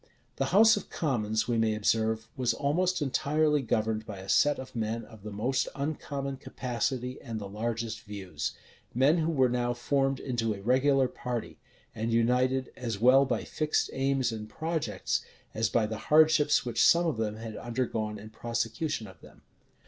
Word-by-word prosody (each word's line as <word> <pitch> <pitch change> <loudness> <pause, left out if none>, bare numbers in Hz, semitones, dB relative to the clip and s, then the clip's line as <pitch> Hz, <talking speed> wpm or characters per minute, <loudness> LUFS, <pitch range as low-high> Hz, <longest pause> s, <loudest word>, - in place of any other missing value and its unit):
The 135 - +1
house 215 +9 +6
of 205 - -7
commons, 110 -7 -1
we 120 -2 +1
may 110 -1 +2
observe, 110 +1 0
was 130 -3 0
almost 175 +4 +1
entirely 150 +2 +1
governed 110 -2 0
by 105 -3 -8
a 95 +1 -9
set 145 0 +4
of 130 - -9
men 115 +1 -2
of 110 -3 -15
the 105 - -7
most 125 +6 0
uncommon 140 -1 -3
capacity 125 0 -3
and 115 -1 -5
the 100 - -6
largest 115 +2 -3
views; 95 -7 -5 0.4
men 140 +7 +4
who 160 0 +1
were 130 -5 +3
now 120 0 0
formed 135 +2 0
into 115 -4 -1
a 100 - -10
regular 130 +3 +3
party, 125 -2 -5 0.3
and 110 +1 -2
united, 125 +3 +2
as 115 -4 -4
well 130 +5 +6
by 130 - -1
fixed 155 -1 -1
aims 135 -2 +1
and 110 -1 -6
projects, 160 +4 -2 0.3
as 110 -1 0
by 115 -2 +2
the 110 0 -4
hardships 155 -2 +5
which 120 -2 +1
some 170 +1 +5
of 160 -8 0
them 110 -1 -1
had 110 0 -7
undergone 115 -3 -2
in 110 +1 -11
prosecution 115 +3 -2
of 95 -4 -14
them. - - -17
120 Hz, 170 wpm, -29 LUFS, 110-140 Hz, 0.4 s, house